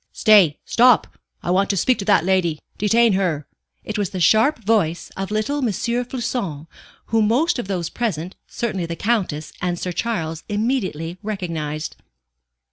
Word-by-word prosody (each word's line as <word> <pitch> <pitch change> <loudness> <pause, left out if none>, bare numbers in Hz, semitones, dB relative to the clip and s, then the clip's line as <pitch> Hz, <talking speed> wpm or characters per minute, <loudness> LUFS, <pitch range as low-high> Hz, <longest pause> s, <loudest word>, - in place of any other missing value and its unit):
"Stay! 200 -9 +5
Stop! 245 0 +4 0.3
I 175 - -1
want 195 +2 +2
to 200 - +1
speak 250 +8 +2
to 200 - -3
that 195 -5 +3
lady; 180 -5 +1 0.2
detain 225 +1 +4
her." 175 -7 0 0.4
It 215 -1 -4
was 200 -4 0
the 185 - -5
sharp 220 - +4
voice 195 -7 +1
of 195 0 -4
little 215 +7 -1
M. 270 - 0
Floçon, 235 - -2 0.4
whom 220 -2 +2
most 270 +7 +2
of 240 - -4
those 180 -4 -2
present, 185 -7 -3
certainly 195 -7 -3
the 170 - -4
Countess 185 -7 -1
and 175 -1 -1
Sir 180 - -3
Charles, 165 -6 -3
immediately 205 - -2
recognized. 165 -8 -4
195 Hz, 155 wpm, -21 LUFS, 170-230 Hz, 0.4 s, Stay